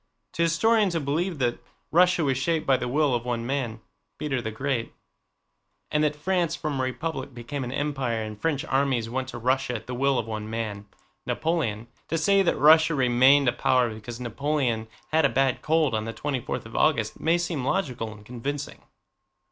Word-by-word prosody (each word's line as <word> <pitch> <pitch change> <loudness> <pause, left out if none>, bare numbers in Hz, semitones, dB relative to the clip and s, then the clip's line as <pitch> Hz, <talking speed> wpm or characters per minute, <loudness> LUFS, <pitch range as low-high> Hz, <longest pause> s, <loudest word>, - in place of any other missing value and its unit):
To - - -2
historians 195 +3 +3
who - - +2
believe 160 +5 -1
that 120 -3 0 0.3
Russia 180 0 +4
was 135 -2 +1
shaped 155 +4 0
by 135 - +4
the 125 -1 -2
will 145 +1 +2
of 120 -1 0
one 120 -1 -2
man—Peter 130 +2 -4
the 110 - -3
Great—and 135 +4 -5
that 150 -1 +1
France 170 +1 0
from 150 -4 -3
a - - +1
republic 135 0 -4
became 130 +4 -5
an 125 - -5
empire 135 -5 -1
and 105 -1 -8
French 155 -4 0
armies 130 -4 0
went 130 +1 -2
to 130 - -7
Russia 125 +1 0
at 115 - -6
the 125 - -6
will 135 +1 +2
of 115 - -1
one 110 -1 -5
man—Napoleon—to 115 +6 -4
say 195 +4 +4
that 190 - +1
Russia 160 +2 +6
remained 130 +2 +5
a 120 - +3
power 125 -3 +2
because 115 +2 -8
Napoleon 125 -2 -1 0.2
had 160 +1 +3
a 140 - +5
bad 135 +1 +1
cold 155 -4 +2
on 110 0 -1
the 115 - -4
twenty 140 +3 -2
fourth - - -4
of 115 - -11
August 130 -9 +1
may 165 +2 +2
seem 170 -6 -2
logical 125 - -1
and 105 -1 -13
convincing. 135 +5 -5
135 Hz, 180 wpm, -26 LUFS, 120-155 Hz, 0.3 s, Russia